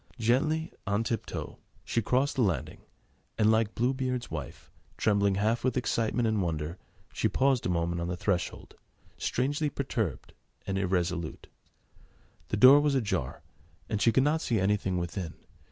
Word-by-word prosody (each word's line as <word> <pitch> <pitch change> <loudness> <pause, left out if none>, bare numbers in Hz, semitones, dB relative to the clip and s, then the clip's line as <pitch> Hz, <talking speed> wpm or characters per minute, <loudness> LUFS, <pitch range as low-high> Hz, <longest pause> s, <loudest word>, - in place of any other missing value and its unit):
Gently, 155 +8 +1
on 100 +3 +1
tip 115 -1 -2
toe, - - -6 0.3
she 115 - 0
crossed 130 +6 +1
the 130 - +1
landing 90 - -1 0.6
and, 110 0 +4
like 110 -1 +1
Blue 125 +3 +1
Beard's 130 -2 -3
wife, 75 -6 -7 0.3
trembling 100 -2 +2
half 110 +4 +1
with 130 +1 +1
excitement 120 -1 0
and 110 -2 +1
wonder, 80 0 -3 0.3
she - - +1
paused 135 -4 +2
a - - -1
moment 85 0 0
on 85 - -2
the 90 0 -3
threshold, 90 -1 -2 0.5
strangely 145 +4 0
perturbed 115 - -3 0.3
and 95 0 -1
irresolute. 90 -3 -2 1.0
The - - -2
door 130 +6 +8
was 145 -1 +2
ajar, 105 - -2 0.5
and 105 -2 -1
she 115 - +5
could 130 +4 +3
not 155 +3 +1
see 115 -4 0
anything 95 -1 +1
within. 85 0 -4
110 Hz, 155 wpm, -29 LUFS, 90-130 Hz, 1.0 s, door